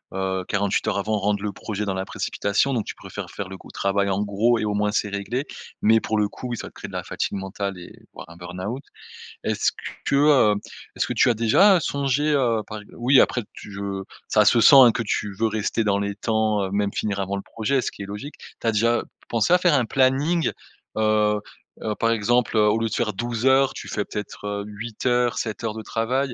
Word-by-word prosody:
heu, 95 Hz, -1 st, -2 dB
48 100 Hz, +1 st, 0 dB
heures 105 Hz, -, 0 dB
avant, 105 Hz, +1 st, 0 dB
rendre 100 Hz, 0 st, 0 dB
le 105 Hz, -, -1 dB
projet 105 Hz, +1 st, -4 dB
dans 95 Hz, -, -1 dB
la 95 Hz, 0 st, -3 dB
précipitation, 105 Hz, +7 st, -1 dB
donc 115 Hz, -, 0 dB
tu -, -, -6 dB
préfères -, -, -8 dB
faire 95 Hz, -1 st, -6 dB
le 95 Hz, -, -8 dB
gros -, -, -15 dB
travail 100 Hz, 0 st, 0 dB
en 100 Hz, +2 st, 0 dB
gros 105 Hz, +4 st, +2 dB
et 110 Hz, -, -1 dB
au 105 Hz, -, -1 dB
moins 105 Hz, 0 st, +1 dB
c'est 105 Hz, -1 st, 0 dB
réglé. 100 Hz, +7 st, -3 dB, 0.4 s
Mais 110 Hz, +1 st, +5 dB
pour 110 Hz, 0 st, -2 dB
le 105 Hz, -, +2 dB
coup 125 Hz, -, -8 dB
oui 120 Hz, -, -3 dB
ça -, -, -7 dB
crée -, -, -9 dB
de -, -, -12 dB
la -, -, -3 dB
fatigue 100 Hz, -, -3 dB
mentale 100 Hz, 0 st, -4 dB
et 90 Hz, -, -9 dB
et -, -, -19 dB
voire -, -, -10 dB
un -, -, -12 dB
burn-out. 90 Hz, +9 st, -6 dB, 0.6 s
Est-ce -, -, +1 dB, 0.3 s
que, -, -, +1 dB
heu, 140 Hz, -7 st, +5 dB, 0.4 s
est-ce -, -, 0 dB
que -, -, -3 dB
tu -, -, +4 dB
as -, -, +4 dB
déjà, 115 Hz, -, +5 dB
heu, 180 Hz, -, +3 dB
songé, 140 Hz, +2 st, 0 dB
heu, 120 Hz, -6 st, +2 dB
par 110 Hz, 0 st, -7 dB
ex 105 Hz, -, -17 dB
oui 125 Hz, +3 st, +4 dB
après 125 Hz, -, +3 dB
tu 105 Hz, -, -11 dB
je 100 Hz, -1 st, -4 dB, 0.3 s
ça 105 Hz, -1 st, +4 dB
se 115 Hz, +3 st, +5 dB
sent 140 Hz, -, +8 dB
hein 125 Hz, -3 st, +9 dB
que 115 Hz, -, -1 dB
tu 105 Hz, -1 st, -2 dB
veux 115 Hz, -, +2 dB
rester 110 Hz, +1 st, -1 dB
dans 100 Hz, -1 st, +1 dB
les 100 Hz, 0 st, -2 dB
temps, 110 Hz, -1 st, 0 dB
heu, 95 Hz, -, -3 dB
même 100 Hz, 0 st, 0 dB
finir 100 Hz, -2 st, -2 dB
avant 100 Hz, +1 st, -2 dB
le 100 Hz, -, -3 dB
projet 125 Hz, +4 st, -1 dB
ce -, -, -3 dB
qui -, -, -8 dB
est -, -, -6 dB
logique. 105 Hz, +9 st, -7 dB, 0.3 s
Tu 115 Hz, -, -2 dB
as -, -, +4 dB
déjà 115 Hz, +2 st, +2 dB
p -, -, -20 dB, 0.2 s
pensé 115 Hz, +6 st, +1 dB
à 180 Hz, -, +7 dB
faire 175 Hz, -3 st, +3 dB
un 130 Hz, -, +3 dB
planning, 135 Hz, +7 st, +2 dB, 0.5 s
heu, 105 Hz, -1 st, +2 dB, 0.4 s
heu, 110 Hz, -1 st, -1 dB
par 115 Hz, 0 st, +2 dB
exemple, 115 Hz, +1 st, +1 dB
heu, 105 Hz, -1 st, +5 dB
au 105 Hz, -, +3 dB
lieu 115 Hz, -, 0 dB
de 110 Hz, -, -6 dB
faire 110 Hz, -3 st, 0 dB
12 120 Hz, +3 st, -3 dB
heures 135 Hz, 0 st, +4 dB
tu -, -, -8 dB
fais 105 Hz, -, -2 dB
peut-être, 105 Hz, -1 st, -7 dB
heu, 100 Hz, 0 st, -3 dB
8 110 Hz, +3 st, -7 dB
heures, 120 Hz, -1 st, +2 dB
7 110 Hz, -1 st, -3 dB
heures 110 Hz, -2 st, -1 dB
de 110 Hz, -, -6 dB
travail, 125 Hz, +5 st, -1 dB
110 Hz, 245 wpm, -23 LUFS, 100-120 Hz, 0.6 s, hein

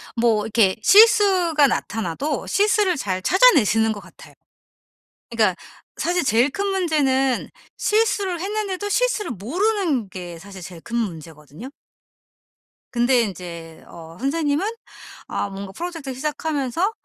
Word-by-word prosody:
뭐 230 Hz, -3 st, +2 dB
이렇게 215 Hz, -4 st, +2 dB
실수가 385 Hz, -, +5 dB
나타나도 225 Hz, -, -3 dB
실수를 405 Hz, -3 st, +2 dB
잘 185 Hz, -7 st, -3 dB
찾아내시는 225 Hz, -, +4 dB
것 210 Hz, -, -5 dB
같아요. -, -, -16 dB, 1.0 s
그니까 215 Hz, -6 st, +1 dB, 0.4 s
사실 350 Hz, -3 st, 0 dB
제일 240 Hz, +4 st, +3 dB
큰 400 Hz, +8 st, -3 dB
문제는 285 Hz, -9 st, 0 dB, 0.3 s
실수를 405 Hz, -5 st, 0 dB
했는데도 410 Hz, 0 st, -3 dB
실수를 485 Hz, -, 0 dB
모르는 310 Hz, -, -1 dB
게 175 Hz, -2 st, -8 dB
사실 190 Hz, +1 st, -11 dB
제일 170 Hz, -2 st, -10 dB
큰 235 Hz, -, -6 dB
문제거든요. 165 Hz, -, -6 dB, 1.2 s
근데 240 Hz, +1 st, +3 dB
인제 170 Hz, -5 st, -7 dB
어 165 Hz, 0 st, -12 dB
선생님은 290 Hz, +4 st, 0 dB, 0.6 s
아 205 Hz, -, -3 dB
뭔가 195 Hz, 0 st, -8 dB
프로젝트를 330 Hz, -6 st, -6 dB
시작하면서 300 Hz, -, -2 dB
265 Hz, 285 characters per minute, -22 LUFS, -, 1.2 s, 실수가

